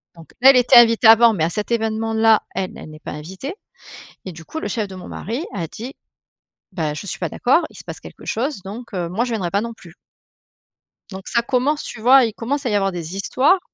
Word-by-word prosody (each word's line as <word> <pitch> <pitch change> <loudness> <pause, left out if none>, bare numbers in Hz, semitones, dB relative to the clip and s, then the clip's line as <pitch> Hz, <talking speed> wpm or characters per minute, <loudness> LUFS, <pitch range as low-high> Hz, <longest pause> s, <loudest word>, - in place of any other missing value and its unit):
Donc 165 -1 -15
là, 265 - +9
elle 270 - +7
était 245 -1 +4
invitée 230 0 +6
avant 225 +1 +7
mais 170 -7 -1
à 165 - +1
cet 210 +6 -4
événement 225 -1 -1
là, 220 -1 +4
elle, 190 -1 -2
elle - - -10
n'est 155 0 -12
pas - - -8
invitée 190 - -7 0.7
et 185 - -5
du 165 -1 -12
coup 320 - -6
le - - -4
chef 220 -4 -2
de 190 - -10
mon 185 - -10
mari 240 - -5
a 165 - -3
dit: 245 - -9 0.8
«Bah 155 -5 -2
je 180 - -7
suis 180 - -5
pas 175 - -2
d'accord, 270 +8 +2
il - - -16
se - - -12
passe - - -8
quelque - - -13
chose 255 -2 -2
donc, 220 +6 -9
heu, 175 -2 -2
moi, 200 +8 -1
je 250 - -5
viendrai 195 -7 -2
pas 200 - +1
non 235 0 -5
plus». 175 -6 -16 1.2
Donc 190 0 -9
ça 235 - +1
commence, 260 +5 0
tu 220 - -8
vois? 255 +2 +6
Il 225 - -4
commence 275 +6 -3
à - - +1
y 210 - 0
avoir 195 -1 +1
des 175 0 -6
histoires. 265 - +2
220 Hz, 245 wpm, -20 LUFS, 185-245 Hz, 1.2 s, là